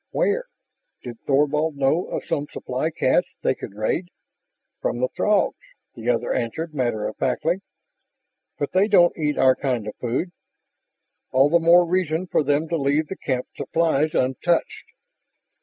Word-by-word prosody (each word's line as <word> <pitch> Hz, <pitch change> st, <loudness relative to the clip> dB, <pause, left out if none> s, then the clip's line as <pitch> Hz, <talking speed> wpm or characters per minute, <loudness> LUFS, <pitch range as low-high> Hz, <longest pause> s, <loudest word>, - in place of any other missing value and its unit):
"Where?" 475 Hz, +5 st, 0 dB, 0.6 s
Did 120 Hz, -2 st, -8 dB
Thorvald 150 Hz, +2 st, +2 dB
know 140 Hz, +5 st, +1 dB
of -, -, -5 dB
some 145 Hz, -3 st, -2 dB
supply -, -, -2 dB
cache -, -, +1 dB
they -, -, +3 dB
could 100 Hz, -, -9 dB
raid? 110 Hz, -, -1 dB, 0.7 s
"From -, -, -1 dB
the -, -, +1 dB
Throgs," -, -, +1 dB, 0.4 s
the 120 Hz, -1 st, -4 dB
other 120 Hz, 0 st, +1 dB
answered 155 Hz, +7 st, -3 dB
matter 120 Hz, -6 st, -1 dB
of -, -, -7 dB
factly. 165 Hz, +8 st, 0 dB, 1.0 s
"But -, -, -2 dB
they 190 Hz, +3 st, +3 dB
don't 175 Hz, -5 st, +5 dB
eat 150 Hz, -2 st, -1 dB
our 130 Hz, -1 st, +5 dB
kind 125 Hz, -6 st, -2 dB
of 105 Hz, -, -6 dB
food...." 130 Hz, +9 st, -2 dB, 1.0 s
"All 135 Hz, +3 st, +4 dB
the 170 Hz, -, +5 dB
more 170 Hz, +2 st, +6 dB
reason 175 Hz, -1 st, 0 dB
for 175 Hz, -, +1 dB
them 145 Hz, +2 st, +1 dB
to 170 Hz, -, 0 dB
leave 145 Hz, +2 st, +1 dB
the 190 Hz, -, -4 dB
camp 130 Hz, -7 st, -2 dB
supplies 160 Hz, -2 st, 0 dB
untouched." 135 Hz, +7 st, 0 dB
150 Hz, 155 wpm, -23 LUFS, 130-170 Hz, 1.0 s, more